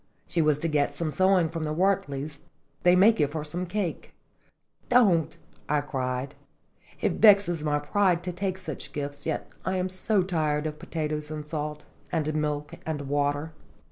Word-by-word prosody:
"She 170 - 0
was 150 -2 +3
to 165 - -2
get 145 -2 +1
some 160 0 -1
sewing 185 0 +4
from 165 0 -4
the 155 0 -2
Wertley's 155 -6 0 0.4
they 180 0 +5
may 195 +5 +7
give 150 -9 0
her 155 -2 -3
some 175 +4 -4
cake." 185 -2 -3 0.7
"Don't!" 200 -10 +4 0.3
I 150 -1 +2
cried, 130 -1 -3 0.7
it - - 0
vexes 200 -7 +6
my 150 -1 +1
pride 175 +3 +1
to 180 - -3
take 185 +1 -2
such 185 - -6
gifts 145 -1 -5
yet - - -2 0.2
I 190 - -1
am 185 0 -1
so 190 +2 +1
tired 155 -4 0
of 155 -1 -4
potatoes 150 -2 -3
and 155 -1 -5
salt, 150 -1 -4 0.3
and 155 -2 0
milk 150 -1 -2
and 155 -2 -3
water." 145 +2 -1
155 Hz, 170 wpm, -27 LUFS, 150-180 Hz, 0.7 s, may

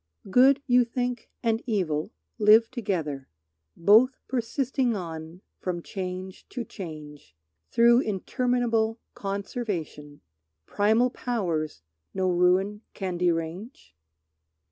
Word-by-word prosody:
Good, 270 +5 +5
you 250 -1 +5
think, 245 0 -3
and 225 -1 +1
evil 175 -8 -1 0.3
live 220 +2 +6
together, 165 - -3 0.5
Both 220 +9 +5
persisting 255 0 0
on 165 -1 -7 0.2
from 175 -2 -3
change 185 -1 -6
to 245 -2 -5
change 150 - -9 0.3
Through 235 +1 +5
interminable 230 0 0 0.2
conservation, 195 -7 -5 0.4
Primal 220 - +2
powers 165 - -2 0.3
no 185 -1 +1
ruin 185 +4 +2
can 185 -3 -3
derange? 175 - -2
205 Hz, 95 wpm, -26 LUFS, 175-240 Hz, 0.5 s, live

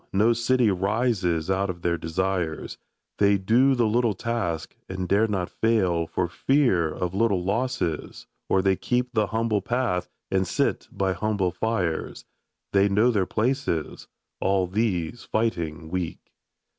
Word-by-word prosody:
No 110 +4 +4
city 120 -1 +2
rises 95 -4 0
out 95 +1 0
of 85 -1 -6
their 85 -1 +2
desires; 85 0 -2 0.4
They 100 0 +4
do 120 +8 +3
the 120 -2 +2
little 115 -1 +2
task, 95 -7 -3
and 95 -1 -3
dare 105 +4 +3
not 95 -4 -2
fail 95 -8 +1
For 85 - -1
fear 95 - +2
of 90 +2 -3
little 100 -3 +1
losses 100 - -2
— - - -54
or 95 - +3
they 95 -1 +3
keep 125 +5 -1
The 110 -3 +2
humble 110 -1 0
path 120 -8 -1 0.2
and 95 -1 +1
sit - - 0
by 95 -1 0
humble 95 -1 0
fires; 90 -3 -2 0.5
They 100 0 +4
know 110 +5 +4
their 100 -5 +1
places 115 - -1 0.2
— - - -57
all 95 -1 +2
these 95 0 -1
fighting 80 -8 -2
Weak! 90 -3 -4
100 Hz, 150 wpm, -25 LUFS, 90-115 Hz, 0.5 s, No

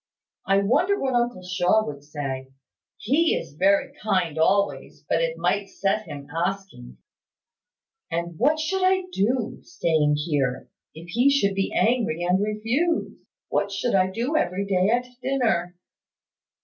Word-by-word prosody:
I 195 +1 +3
wonder 360 - +2
what 265 -1 -1
uncle 240 -6 0
Shaw 185 +4 +2
would 140 -1 -7
say. 140 -3 -5 0.5
He 310 +9 +2
is - - -5
very 195 +6 +2
kind 180 -7 0
always, 200 +5 0
but - - +1
it - - -1
might 200 0 0
set 205 +2 -1
him 140 -1 -8
asking 175 -7 -4 0.6
" 450 - -50
"And 170 0 -3
what 300 +6 +3
should 370 +5 -1
I 375 0 +3
do, 235 - -1
staying 155 - +1
here, 145 -4 -1 0.3
if 165 +2 -11
he 245 +9 +3
should 240 -9 +2
be 195 0 -1
angry 220 -8 +1
and 180 +2 +2
refuse? 225 +11 0 0.4
What 200 - 0
should 215 +5 -1
I 185 -1 +3
do 240 +10 -2
every 200 - 0
day 190 0 +2
at 245 +2 +1 0.2
dinner?" 230 -10 0
200 Hz, 150 wpm, -24 LUFS, 170-250 Hz, 0.6 s, I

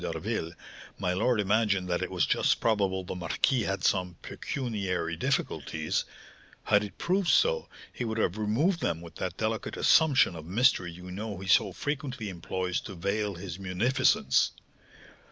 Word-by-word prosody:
d'Harville, 80 - -3 0.5
my 90 -2 0
lord 110 +5 +2
imagined 100 -2 +2
that 90 -1 0
it - - -2
was - - +1
just - - +2
probable 100 -4 +1
the - - -5
marquis 90 +8 +1
had 95 -2 -2
some 90 -1 +1
pecuniary 95 -10 -3
difficulties; 80 - -1 0.6
had 105 0 +3
it 105 - -8
proved 185 +1 0
so, 475 - +3 0.2
he - - -4
would 110 -1 -3
have 95 -4 +1
removed 120 - +1
them 80 - -1
with 85 -1 -11
that 90 -1 -4
delicate 110 0 -2
assumption 145 - +4
of 80 - -7
mystery 95 - +2
you 90 +2 -10
know 105 +1 -5
he 95 +1 -8
so - - +4
frequently 135 -7 -4
employs 90 0 -3
to 100 - -8
veil 100 +3 -1
his 90 0 -7
munificence. 95 - +2
100 Hz, 155 wpm, -29 LUFS, 90-115 Hz, 0.6 s, assumption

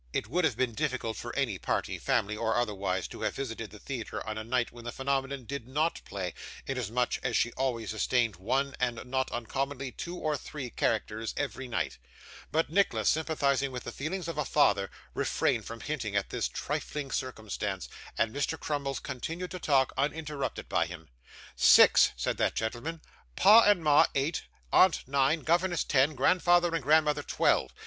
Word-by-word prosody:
It - - 0
would 170 +8 +1
have - - 0
been 125 -3 0
difficult 130 -4 -2
for 120 - -6
any 125 -9 0
party, - - -2
family, 105 +1 0
or 110 0 0
otherwise, 100 -6 -1
to - - -9
have - - -1
visited 115 -5 -5
the 105 - -12
theatre 120 0 -5
on 110 - -3
a 110 - -4
night 120 +1 0
when 120 -1 -12
the 120 - -4
phenomenon 135 0 -2
did 140 -1 -6
NOT 155 +5 0
play, 95 -3 -4 0.3
inasmuch 125 -2 -1
as 125 -3 0
she 115 - +1
always 120 -5 -2
sustained 115 -1 +1
one, 135 +8 -1
and 120 -1 -1
not 130 +1 -1
uncommonly 135 +3 -3
two 175 +6 -6
or 155 -3 -1
three, 135 -3 -6
characters, 110 0 -1
every 135 -2 -3
night; 120 - -2 0.5
but 160 -1 +1
Nicholas, 165 - +2
sympathising 140 -4 +1
with 125 -2 -6
the 120 - -5
feelings 165 +7 -4
of 165 -3 -4
a - - +2
father, 100 -9 +2 0.2
refrained - - 0
from 115 0 -7
hinting 125 -9 -3
at 100 - 0
this - - 0
trifling 145 -3 -4
circumstance, 105 -6 -3 0.3
and 110 -1 +1
Mr 145 +3 -1
Crummles 140 -2 -2
continued 160 +6 -5
to 185 - -5
talk, 135 -5 +2
uninterrupted 150 0 -2
by - - +1
him. 80 -3 -10 0.5
'Six,' - - +7
said - - -1
that - - +1
gentleman; 120 +9 -3 0.3
'pa 215 +4 +8
and 205 -5 +4
ma 150 -1 +6
eight, 140 +4 0 0.3
aunt 185 -8 +5
nine, 140 +4 +2
governess 175 +2 +1
ten, 145 +2 +2
grandfather 175 +4 +3
and 165 - 0
grandmother 150 +2 +3
twelve. - - +2
135 Hz, 175 wpm, -29 LUFS, 115-150 Hz, 0.5 s, pa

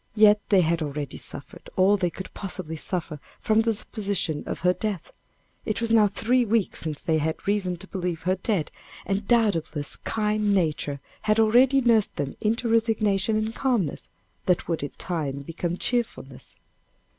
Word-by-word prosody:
Yet 210 -1 +6
they 195 -3 +5
had 165 0 +1
already 145 -2 -4
suffered 140 - -10
all 190 +2 +5
they 180 -3 0
could 190 +3 -9
possibly 185 -4 -5
suffer 160 -2 -4 0.2
from 215 0 +2
the 225 0 +1
supposition 200 -8 -1
of - - -4
her 180 +1 +4
death 205 -4 -4 0.5
it 215 - -2
was 230 -1 -1
now 220 -2 +6
three 240 +5 +1
weeks 225 -2 0
since 155 -3 -4
they 160 -1 +2
had 160 +4 -3
reason 195 -3 0
to 195 - -10
believe 180 -4 -3
her 185 +2 +2
dead, 190 -4 -1 0.3
and 195 +1 -2
doubtless 190 - +1
kind 210 -1 0
Nature 150 -5 0 0.3
had 215 +1 +4
already 250 +5 +5
nursed 230 -4 +3
them 140 -1 -3
into 230 +3 0
resignation 220 -2 +2
and 215 +1 -1
calmness, 240 - -1 0.4
that 180 -2 +2
would 165 -2 -1
in 145 - -3
time 145 -6 -3
become 170 +3 -3
cheerfulness. 220 - -3
195 Hz, 165 wpm, -25 LUFS, 165-220 Hz, 0.5 s, Yet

